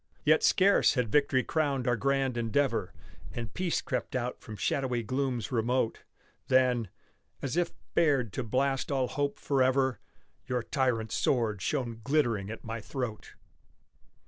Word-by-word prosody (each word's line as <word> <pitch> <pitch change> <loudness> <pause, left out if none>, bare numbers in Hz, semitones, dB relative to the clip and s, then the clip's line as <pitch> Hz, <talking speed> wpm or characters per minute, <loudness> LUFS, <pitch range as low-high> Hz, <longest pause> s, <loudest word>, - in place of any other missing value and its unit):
Yet - - +5
scarce 200 -4 +4
had 125 -5 0
victory 140 -3 +3
crowned 140 -5 0
our 120 - +3
grand 135 0 0
endeavor, 115 -3 0 0.4
And 115 -4 -5
peace 180 -2 0
crept 130 -4 -3
out 125 0 -2
from 110 - -8
shadowy 125 +3 -1
glooms 130 -3 -2
remote 120 0 0 0.5
Than 125 -5 +3 0.5
as 135 +1 -2
if 175 -1 +1 0.2
bared 140 - +2
to 130 - -2
blast 135 +4 0
all 130 -2 +1
hope 145 +2 -2
forever, 130 -1 +2 0.5
Your 125 -2 -1
tyrant's 115 -5 0
sword 110 -6 +1
shone 120 -6 -2
glittering 120 -8 +1
at 115 - -7
my 115 +1 -4
throat! 120 -2 -5
130 Hz, 140 wpm, -30 LUFS, 115-140 Hz, 0.5 s, Yet